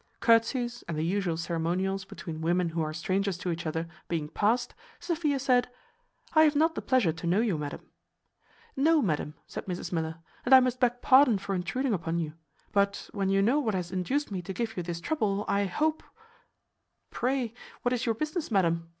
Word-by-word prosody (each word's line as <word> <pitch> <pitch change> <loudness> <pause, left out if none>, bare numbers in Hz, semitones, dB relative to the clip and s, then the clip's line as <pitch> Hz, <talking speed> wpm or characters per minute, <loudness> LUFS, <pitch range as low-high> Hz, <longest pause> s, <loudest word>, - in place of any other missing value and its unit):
Curtsies 240 +1 +2
and 165 -2 -3
the 155 - 0
usual 180 -2 0
ceremonials 180 +4 -1
between 165 -4 -7
women 175 +1 +1
who 165 0 -2
are 155 -1 -1
strangers 185 +3 -1
to 180 0 -3
each 165 0 -4
other, 160 +1 -2 0.2
being 160 -3 -2
past, 235 +7 +1 0.3
Sophia 330 -5 0
said, 250 -2 +2 0.6
"I 315 - +6
have 305 -1 +5
not 320 +3 +3
the - - -4
pleasure 245 -11 +2
to 165 +1 -6
know 180 +4 +3
you, 220 -6 +1
madam." 150 -1 -5 0.9
"No, 310 +2 +4
madam," 150 -4 -1
answered - - -7
Mrs 180 -1 -4
Miller, 160 -2 -2 0.3
"and 265 +2 +7
I - - +10
must 255 -1 0
beg 245 -1 +1
pardon 260 -4 +6
for 195 0 -4
intruding 240 +8 -1
upon 170 -2 -1
you. 160 -3 -2 0.4
But 200 -1 0
when 195 -1 0
you 195 0 +3
know 250 +8 +3
what 220 -8 0
has 180 -2 -3
induced 215 +10 -1
me 190 -2 -3
to 190 +2 -6
give 225 +2 -3
you 180 - -2
this 170 -1 -5
trouble, 210 - 0
I 200 0 +2
hope 310 - 0 0.6
" - - -51
"Pray, 250 -2 -1 0.3
what 245 - +1
is 245 -1 -1
your 225 - +2
business, 305 - -3
madam?" 170 -5 +1
200 Hz, 195 wpm, -29 LUFS, 170-250 Hz, 0.9 s, I